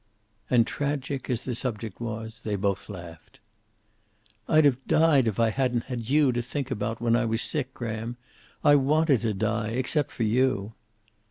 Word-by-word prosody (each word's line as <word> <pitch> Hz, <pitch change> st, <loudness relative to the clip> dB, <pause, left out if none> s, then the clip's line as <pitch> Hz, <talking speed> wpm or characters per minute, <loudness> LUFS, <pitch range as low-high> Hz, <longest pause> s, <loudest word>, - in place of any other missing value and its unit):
And, 120 Hz, -2 st, +4 dB
tragic 140 Hz, 0 st, -3 dB
as 125 Hz, -1 st, -2 dB
the 125 Hz, -, -2 dB
subject 115 Hz, -3 st, -4 dB
was, 110 Hz, -1 st, -5 dB
they 105 Hz, -2 st, -1 dB
both 100 Hz, 0 st, -1 dB
laughed. 85 Hz, -4 st, -10 dB, 1.1 s
"I'd 155 Hz, -1 st, +5 dB
have 135 Hz, -2 st, +2 dB
died 150 Hz, -6 st, +4 dB
if 110 Hz, -1 st, -1 dB
I 115 Hz, -1 st, +3 dB
hadn't 125 Hz, -1 st, 0 dB
had 120 Hz, -3 st, -5 dB
you 145 Hz, -1 st, +4 dB
to 120 Hz, 0 st, -1 dB
think 130 Hz, +2 st, -4 dB
about 115 Hz, -1 st, -2 dB
when 115 Hz, 0 st, +2 dB
I 120 Hz, 0 st, +2 dB
was 115 Hz, 0 st, 0 dB
sick, 135 Hz, -4 st, -1 dB
Graham. 115 Hz, 0 st, -4 dB, 0.5 s
I 145 Hz, -2 st, +7 dB
wanted 145 Hz, -1 st, +3 dB
to 110 Hz, -3 st, -1 dB
die 110 Hz, +1 st, -1 dB
except 130 Hz, +3 st, 0 dB
for 115 Hz, -, -3 dB
you." 115 Hz, -2 st, +1 dB
120 Hz, 170 wpm, -26 LUFS, 110-135 Hz, 1.1 s, I